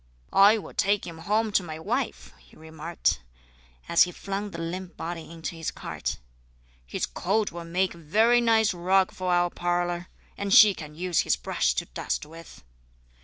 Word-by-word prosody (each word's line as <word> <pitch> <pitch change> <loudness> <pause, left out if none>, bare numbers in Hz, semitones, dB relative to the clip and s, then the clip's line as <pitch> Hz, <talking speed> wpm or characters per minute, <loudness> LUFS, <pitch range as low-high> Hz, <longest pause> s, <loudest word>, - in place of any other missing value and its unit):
"I 205 +3 +7
will 215 - -8
take 200 +1 +1
him 165 -1 -8
home 215 +6 0
to 195 - +3
my 160 -3 -7
wife," 235 +10 -3
he - - -21
remarked, 160 - -2 0.7
as 170 - +3
he 180 - +5
flung 200 +2 -4
the 170 - -8
limp 175 +2 -5
body 165 -1 -6
into 165 0 -6
his 165 -1 -3
cart. - - -5 0.7
"His - - -2
coat 210 +3 -1
will 170 0 -7
make 180 +2 0
a 170 - -14
very 220 +10 +3
nice 220 -3 +3
rug 185 +2 +2
for 185 -1 -3
our 175 0 +2
parlour, 175 0 -1 0.3
and 200 0 -4
she 210 0 +9
can 150 -4 -10
use 180 +1 0
his - - +2
brush - - 0
to - - -1
dust - - -4
with." 165 - -13
175 Hz, 175 wpm, -26 LUFS, 165-200 Hz, 0.7 s, she